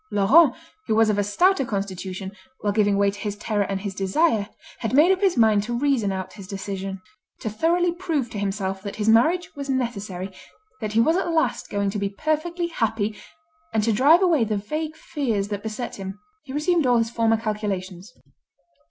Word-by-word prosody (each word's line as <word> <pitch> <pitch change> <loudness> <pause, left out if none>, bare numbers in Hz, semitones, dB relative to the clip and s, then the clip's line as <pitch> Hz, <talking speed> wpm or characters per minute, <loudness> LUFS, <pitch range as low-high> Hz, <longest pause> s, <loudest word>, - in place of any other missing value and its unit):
Laurent, 250 +9 +5 0.3
who 220 - +2
was 220 -1 +4
of 205 - 0
a - - +2
stouter 350 - +3
constitution, 190 -3 -4 0.3
while 205 -1 0
giving 205 -1 +2
way 200 0 +3
to 205 - -11
his 205 0 -3
terror 210 0 -1
and 195 -1 -2
his 200 -1 -4
desire, 205 - +1 0.3
had 235 +1 -1
made 315 +6 +6
up 380 0 +1
his 385 -3 +2
mind 220 -3 +5
to 235 +3 -3
reason 255 -7 +1
out 190 -1 -5
his 195 -3 -11
decision. 195 0 -5 0.4
To 220 - -3
thoroughly 340 - +2
prove 330 -7 -2
to 205 - -4
himself 195 -1 -2
that 200 0 -6
his 215 0 -2
marriage 315 +11 +3
was 280 -1 -6
necessary, 205 -8 -3 0.5
that 215 -3 -4
he 225 - +3
was 320 +9 +4
at 365 - -1
last 320 -1 0
going 200 -1 -1
to 205 - -3
be 200 0 -1
perfectly 310 - -1
happy, 220 -7 -1 0.6
and 215 - +2
to 225 +1 +2
drive 300 - +5
away 330 -9 +4
the 215 -1 -1
vague 305 +9 -4
fears 230 -11 -2
that 205 -1 -3
beset 220 +3 -5
him, 195 0 -7 0.3
he 265 - -9
resumed 305 +1 +1
all 245 -1 +4
his 230 0 0
former 225 -1 +2
calculations. 205 -3 -4
215 Hz, 195 wpm, -24 LUFS, 200-285 Hz, 0.6 s, made